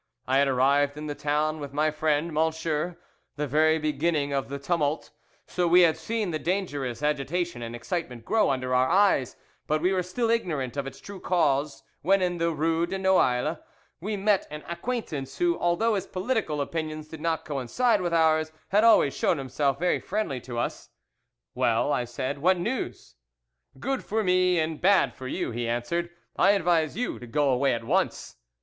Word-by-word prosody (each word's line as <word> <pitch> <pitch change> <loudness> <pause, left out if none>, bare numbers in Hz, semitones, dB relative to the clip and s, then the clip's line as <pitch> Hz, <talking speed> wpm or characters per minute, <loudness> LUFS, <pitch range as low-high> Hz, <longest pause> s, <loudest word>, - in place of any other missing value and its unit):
I 135 +1 +3
had 140 - +3
arrived 140 +2 +2
in 150 - -6
the 150 - -3
town 150 +2 -1
with 140 -2 -7
my 155 +2 +1
friend 155 +1 0
M____ 160 +1 -1 0.4
the 150 +1 -2
very 155 +3 +3
beginning 150 -1 0
of 135 -1 -2
the 140 - -4
tumult, 150 0 -1 0.3
so 180 -1 -1
we 175 +2 +6
had 165 -3 +5
seen 210 +3 -2
the 155 - -2
dangerous 145 - -2
agitation 150 0 -1
and 115 0 -5
excitement 125 -3 -4
grow 215 0 +2
under 130 -1 -1
our 130 +1 +3
eyes, 185 -9 +3 0.3
but 155 0 +1
we 180 +4 +1
were 185 - +1
still 225 +6 -1
ignorant 150 - -1
of 140 -1 -3
its 135 0 -9
true 200 +6 -9
cause, 150 -6 0 0.2
when, 195 +5 +3
in 175 -2 -1
the 170 0 +2
rue 165 +1 0
de 195 - -3
Noailles, 160 -6 +2 0.4
we 210 +4 -3
met 200 0 +1
an 150 +1 -8
acquaintance, 170 - -4
who, 350 -1 +2
although 175 +7 +2
his 195 -2 -2
political 185 - -1
opinions 155 +1 -4
did 155 0 -10
not 165 -1 -1
coincide 185 - +1
with 175 -1 -1
ours, 160 -1 +3 0.2
had 210 +3 +3
always 220 -11 +5
shown - - +1
himself 135 +1 -1
very 180 +4 +1
friendly 185 - -3
to 120 -1 -7
us. 120 - -3 0.6
'Well,' 125 - +1
said 130 +3 -3
I, - - -12
'what 185 +5 +3
news?' 215 - -4 0.7
'Good 270 - -2
for 220 +1 -1
me 180 -1 +3
and 160 -1 -1
bad 195 +1 +4
for 130 - -8
you,' - - -3
he 120 0 -3
answered;' 120 +9 -2 0.3
I 195 +2 +5
advise 170 -4 +1
you 245 - -2
to 120 - -10
go 145 +3 +1
away 130 0 +2
at 115 - -6
once. 180 - -1
155 Hz, 185 wpm, -26 LUFS, 140-180 Hz, 0.7 s, we